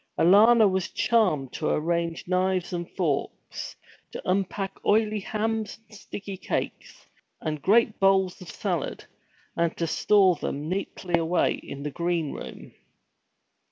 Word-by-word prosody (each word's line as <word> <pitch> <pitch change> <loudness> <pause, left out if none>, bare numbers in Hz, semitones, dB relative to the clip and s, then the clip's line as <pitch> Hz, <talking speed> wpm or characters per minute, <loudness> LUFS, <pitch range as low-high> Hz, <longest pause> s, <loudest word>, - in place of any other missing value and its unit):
Alanna 215 +5 +6
was 190 -2 -1
charmed 185 - +1
to 155 - -2
arrange 170 +1 -1
knives 185 0 0
and 175 -1 -4
forks, 160 -7 -3 0.4
to - - -6
unpack 195 +1 -2
oily 215 0 +2
hams 220 +2 -2
and 215 - -15
sticky 200 -1 -7
cakes, - - -4 0.3
and 155 -2 -3
great 220 - +3
bowls 190 -2 +3
of 180 - -10
salad, - - -3 0.5
and 170 -1 0
to 170 - 0
store 190 +1 +3
them 145 +1 -4
neatly 180 -1 -2
away 165 +2 +2
in 140 +1 -8
a 150 - -2
green 170 -2 -1
room. - - -9
185 Hz, 130 wpm, -26 LUFS, 170-205 Hz, 0.5 s, Alanna